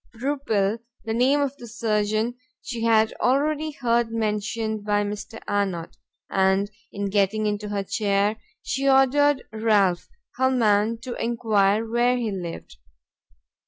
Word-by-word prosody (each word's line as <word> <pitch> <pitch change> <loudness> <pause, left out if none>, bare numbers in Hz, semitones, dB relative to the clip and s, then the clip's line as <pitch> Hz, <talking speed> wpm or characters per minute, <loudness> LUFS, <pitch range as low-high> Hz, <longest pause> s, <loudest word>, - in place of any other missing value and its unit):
Rupil, 230 -5 0 0.3
the 220 - -2
name 260 +5 +3
of 280 -1 -1
the 240 - -10
surgeon, 215 0 0 0.3
she 235 -2 -5
had 220 -1 +3
already 300 +4 +1
heard 240 -5 0
mentioned 220 0 -2
by 205 0 +1
Mr. 210 +2 -6
Arnott, 190 -5 -2 0.3
and 190 +1 +1 0.2
in 200 -1 -3
getting 205 +2 +1
into 210 0 -2
her 200 -1 -2
chair, 205 +1 0 0.3
she 270 +3 0
ordered 270 +1 +4
Ralph, 210 -5 +2 0.3
her 260 0 +3
man, 225 -3 +2
to 255 - -5
enquire 220 -2 +1
where 240 +2 +2
he 230 -3 -2
lived. 175 - -7
220 Hz, 130 wpm, -24 LUFS, 205-245 Hz, 0.3 s, ordered